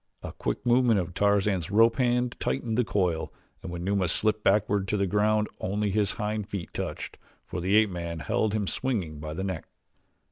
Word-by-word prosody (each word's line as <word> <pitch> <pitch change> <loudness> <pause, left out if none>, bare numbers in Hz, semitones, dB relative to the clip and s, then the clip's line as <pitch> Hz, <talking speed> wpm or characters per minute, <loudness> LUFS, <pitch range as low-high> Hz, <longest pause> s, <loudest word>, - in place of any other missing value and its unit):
A - - -5
quick - - -4
movement 120 -3 +4
of 90 -1 -4
Tarzan's 100 -3 +1
rope 115 +3 +4
hand 125 -1 +1
tightened 120 -4 -1
the 125 - +3
coil 90 -7 0 0.3
and 95 - -7
when 85 0 -5
Numa 95 -1 +1
slipped 110 +4 +1
backward 100 -1 +2
to 105 - 0
the 100 - +1
ground 105 +2 +2
only 100 +2 -1
his 105 0 +1
hind 105 -2 -3
feet 95 -4 -5
touched, - - -5 0.3
for 90 - -5
the 95 +4 +2
ape 110 -2 +5
man 85 -1 -4
held 110 +5 0
him 105 -2 0
swinging 95 - -2
by 75 0 -6
the 95 - -3
neck. 95 -4 -4
100 Hz, 190 wpm, -27 LUFS, 90-110 Hz, 0.3 s, ape